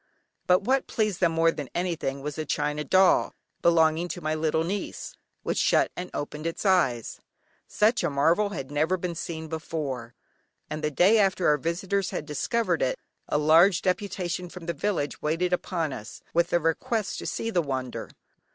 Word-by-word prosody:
But 180 +2 +4
what 265 +5 +1
pleased 215 -5 -1
them 170 -3 +2
more 165 0 +4
than 145 -5 -6
anything 165 -6 -2
was 150 +1 -4
a - - 0
china 150 0 -1
doll, 190 +3 +4 0.3
belonging 165 0 +3
to 175 - -5
my 155 -2 -1
little 155 0 +1
niece, 200 - -4 0.3
which - - -1
shut - - +3
and 180 0 -5
opened 150 +2 -4
its 165 - -4
eyes. 150 - +2 0.5
Such 220 +4 +2
a - - +1
marvel 165 +9 +2
had 135 -8 -6
never 155 +5 +1
been 180 -1 -3
seen 160 -1 -5
before, 145 -7 -4 0.6
and 155 0 -4
the 150 - +1
day 190 +9 +4
after 190 -3 +2
our 150 - +4
visitors 185 +5 -1
had - - -4
discovered 230 - 0
it, - - +1 0.3
a - - +1
large 165 +5 +5
deputation 180 -2 -2
from 180 -1 -10
the 170 - -2
village 180 -9 -2
waited 165 +4 0
upon 170 -5 -1
us, 105 -1 -9
with 170 +1 +2
a 175 - +3
request 205 - -1
to - - -5
see 230 - -2
the 180 - +2
wonder. 130 -4 -4
170 Hz, 180 wpm, -26 LUFS, 150-185 Hz, 0.6 s, large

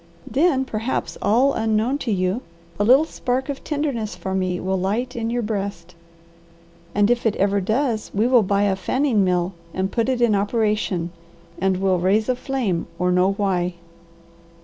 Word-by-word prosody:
Then, 275 -2 +2
perhaps 225 +1 -3
all 250 +7 +3
unknown 225 +5 0
to 245 - -2
you, 185 +4 0 0.4
a - - +3
little 260 +8 +6
spark 260 -3 -2
of 280 - -5
tenderness 280 - -2
for 185 +2 -5
me 185 -1 -1
will 190 +1 -1
light 210 +7 -1
in 230 -1 -2
your 240 0 -1
breast; 200 -5 -4 1.0
and 205 +2 +4
if 240 0 +1
it 215 - 0
ever 200 0 +1
does 220 +2 0
we 210 +3 +1
will 245 -1 +5
buy 200 0 +1
a 200 -2 +2
fanning 245 +1 +1
mill 180 0 0 0.2
and 190 +1 -1
put 230 +2 0
it 255 -2 0
in 235 -3 +3
operation, 205 -4 0 0.5
and 190 -1 +1
we'll 190 -1 +1
raise 200 +5 +2
a 255 - +2
flame 245 -10 -2
or 180 +1 +1
know 180 +2 +3
why." 180 -3 -1
210 Hz, 170 wpm, -22 LUFS, 190-245 Hz, 1.0 s, little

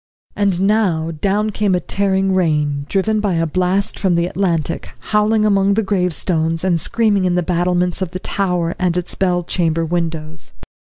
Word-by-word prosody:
And 200 -3 +1
now 190 -6 +1
down 205 +6 -1
came 205 -2 +1
a - - +1
tearing 195 +1 0
rain, 150 -5 0
driven 215 +2 +1
by 205 -4 0
a 165 0 +1
blast 185 +5 0
from 190 -4 +1
the 170 0 +1
Atlantic, 175 -8 -2 0.2
howling 215 0 +3
among 200 -1 +3
the 225 - +1
gravestones, 175 -4 0
and 175 -3 +1
screaming 210 -1 +1
in 180 -1 +1
the 180 - +1
battlements 180 +1 +1
of 185 - -1
the 185 - -5
tower 180 -3 -1
and 180 -1 0
its 180 0 -3
bell 180 -2 0
chamber 165 -2 0
windows. 160 - -4
180 Hz, 170 wpm, -18 LUFS, 165-200 Hz, 0.2 s, howling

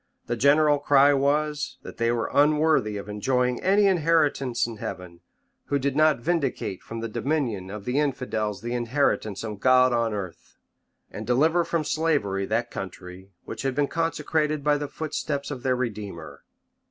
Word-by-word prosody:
The 120 - -2
general 145 +4 +4
cry 145 0 +5
was, 145 0 0
that - - -10
they 115 0 +1
were 115 -1 -2
unworthy 150 -7 +3
of 100 - -7
enjoying 125 +4 0
any 200 +2 +3
inheritance 155 -8 +2
in 115 -2 -7
heaven, 90 -3 -7 0.5
who 145 - 0
did 140 0 -1
not 155 -3 +4
vindicate 135 - -2
from 115 0 -7
the 115 - -3
dominion 115 -6 -2
of 100 0 -8
the 125 +3 0
infidels 110 -8 -2
the 120 +1 -3
inheritance 120 -4 0
of 105 -3 -6
God 130 +1 +4
on 115 -1 +1
earth, 95 -5 -7 0.5
and 105 +1 -7
deliver 160 +8 +3
from 165 -1 -1
slavery 145 -12 0
that 120 +2 -1
country 95 0 -8 0.2
which - - -6
had 135 -1 -2
been 145 0 +1
consecrated 155 -2 -1
by 150 0 +3
the 145 - -3
foot 155 +1 -6
steps 140 -1 -3
of 130 -4 -5
their 130 -1 +1
Redeemer. 105 -9 -6
130 Hz, 165 wpm, -25 LUFS, 110-150 Hz, 0.5 s, cry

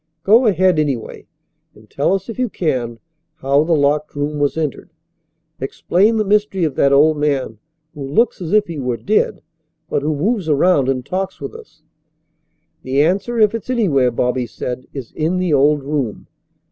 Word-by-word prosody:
Go 225 +5 +5
ahead, 185 -4 +3
anyway, 140 -7 -3 0.5
and 105 0 -18
tell 140 - 0
us, 195 -1 -5
if 230 +1 -7
you 250 -2 0
can, 125 -11 -2 0.4
how 140 +2 +2
the 165 +1 +1
locked 150 +1 0
room 145 +1 -2
was 145 +2 0
entered. 155 -5 -3 0.7
Explain 210 +6 +1
the 215 - +1
mystery 205 -2 +1
of 155 -4 0
that 140 +1 +2
old 150 +2 +4
man 140 -7 -1 0.3
who 150 - -10
looks 220 - +1
as 170 -1 -4
if 210 0 +4
he 165 -5 -6
were 125 -3 -2
dead, 210 - 0 0.5
but - - 0
who 150 +1 -1
moves 190 +3 -1
around 145 -2 +3
and 130 -2 -1
talks 190 +1 -3
with - - -6
us." 455 -1 -15 1.0
"The 135 +2 +1
answer, 195 +8 0
if 215 -1 +4
it's 230 +1 -6
anywhere," 170 - +2
Bobby 125 +1 -1
said, 125 +1 -6
"is 135 -5 -8
in 160 +4 -1
the 180 -3 0
old 145 +1 +3
room." 140 -6 -3
150 Hz, 175 wpm, -18 LUFS, 140-195 Hz, 1.0 s, Go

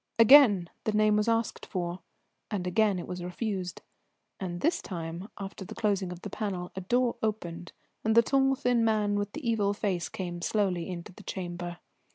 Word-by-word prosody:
Again 230 -6 +8 0.2
the 215 - +1
name 215 0 +4
was 210 +1 +2
asked 230 -1 0
for, 175 -1 -3 0.5
and 195 -4 -2
again 200 +2 +2
it 175 - -4
was 180 -1 -5
refused; 185 0 -4 0.6
and 175 -2 -4
this 335 +2 +2
time, 170 +2 -6
after 195 -1 -6
the 180 - -9
closing 200 -4 0
of 180 0 -9
the 205 - -4
panel, 185 -4 -3
a 190 - -5
door 240 +5 +1
opened, 175 -6 -3 0.3
and 220 0 +2
the 235 - +8
tall 270 +2 +3
thin 245 -2 +2
man 215 -2 +2
with 205 0 -2
the 310 -6 -5
evil 205 -3 +2
face 190 -5 -1
came 175 -2 -5
slowly 185 -3 0
into 175 -1 -6
the - - -13
chamber. 175 -2 -5
200 Hz, 185 wpm, -29 LUFS, 180-220 Hz, 0.6 s, Again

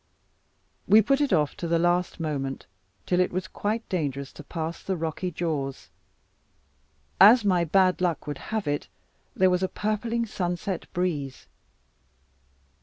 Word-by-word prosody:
We 215 +1 +7
put 275 +6 +2
it 285 - +1
off 150 -5 +2
to 170 - -4
the 170 0 +2
last 175 +1 +1
moment, 140 -4 -3 0.4
till 180 - +1
it 180 - +2
was 180 -1 -3
quite 220 +5 -3
dangerous 140 -6 -3
to - - -11
pass 165 +2 -5
the 190 -1 -2
rocky 165 +3 -3
jaws. 150 -6 -3 1.3
As 220 +2 +8
my 180 -3 +3
bad 185 +2 +3
luck 175 -3 0
would 145 -2 -5
have 220 -4 -2
it, 145 0 -1 0.5
there 185 0 +4
was 180 0 +1
a 190 - +1
purpling 225 +2 -1
sunset 180 -2 -3
breeze. 155 -7 -2
180 Hz, 145 wpm, -26 LUFS, 155-195 Hz, 1.3 s, As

